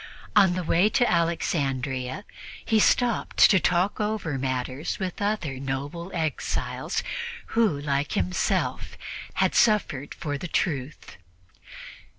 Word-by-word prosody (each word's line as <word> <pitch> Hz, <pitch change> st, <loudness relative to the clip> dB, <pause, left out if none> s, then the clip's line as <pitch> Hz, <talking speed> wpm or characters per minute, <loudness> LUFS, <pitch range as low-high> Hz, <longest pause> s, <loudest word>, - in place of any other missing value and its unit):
On 195 Hz, -4 st, +6 dB
the 185 Hz, -, -2 dB
way 175 Hz, +5 st, +3 dB
to 245 Hz, +3 st, +2 dB
Alexandria 140 Hz, -3 st, -1 dB, 0.4 s
he 220 Hz, -, +3 dB
stopped 240 Hz, +2 st, +2 dB
to 190 Hz, -, +5 dB
talk 180 Hz, +4 st, +1 dB
over 210 Hz, -10 st, -2 dB
matters 130 Hz, +2 st, -2 dB
with 190 Hz, +1 st, -4 dB
other 190 Hz, -11 st, -1 dB
noble 140 Hz, +6 st, -4 dB
exiles 160 Hz, -4 st, -2 dB, 0.5 s
who, 220 Hz, -11 st, +2 dB
like 140 Hz, 0 st, -1 dB
himself, 90 Hz, -1 st, -1 dB, 0.4 s
had 190 Hz, -1 st, +2 dB
suffered 200 Hz, -, +2 dB
for 145 Hz, -2 st, -4 dB
the 175 Hz, -, -5 dB
Truth. 150 Hz, -5 st, -2 dB
165 Hz, 115 wpm, -26 LUFS, 135-195 Hz, 0.5 s, On